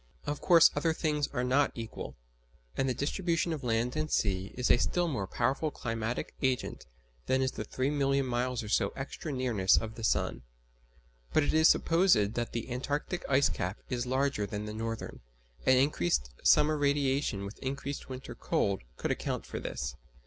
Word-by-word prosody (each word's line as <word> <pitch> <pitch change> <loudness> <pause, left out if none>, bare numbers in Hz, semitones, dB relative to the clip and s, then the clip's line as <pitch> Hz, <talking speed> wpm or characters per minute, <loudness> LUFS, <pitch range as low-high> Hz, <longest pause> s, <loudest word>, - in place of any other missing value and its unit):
Of 145 0 -3
course 170 -2 +7
other 165 -1 +1
things 150 -3 0
are 125 -3 -2
not 135 +2 +3
equal, 115 -2 -6 0.6
and 135 - +1
the - - +1
distribution 170 - 0
of 150 -3 -5
land 120 +1 0
and 155 0 -1
sea 95 -5 0
is 125 - +2
a - - +6
still 175 +7 +1
more 105 - -2
powerful 130 +9 0
climatic 115 -3 -3
agent 130 - -1 0.4
than 130 0 +2
is 130 - 0
the - - -5
three 130 +6 -1
million 140 -1 +1
miles 125 -1 -1
or - - -7
so - - +2
extra 140 +3 -5
nearness 120 -8 +3
of 110 0 -2
the 115 - -9
sun. 110 - 0 0.9
But 155 - +4
it - - 0
is 160 +1 +6
supposed 175 - +4 0.2
that 120 -1 -2
the 120 +1 -4
Antarctic 145 +7 -2
ice 140 +1 +4
cap 95 +1 -3
is 125 0 -1
larger 130 -5 0
than 105 +1 -4
the 105 - -5
northern, 115 +1 -5 0.5
and 130 0 +6
increased 85 - +1
summer 155 +1 +5
radiation 140 -7 +1
with 100 - -9
increased 140 +1 -4
winter 130 0 -7
cold 100 -1 0 0.2
would - - +1
account - - -2
for - - -5
this. - - -4
130 Hz, 180 wpm, -30 LUFS, 115-145 Hz, 0.9 s, course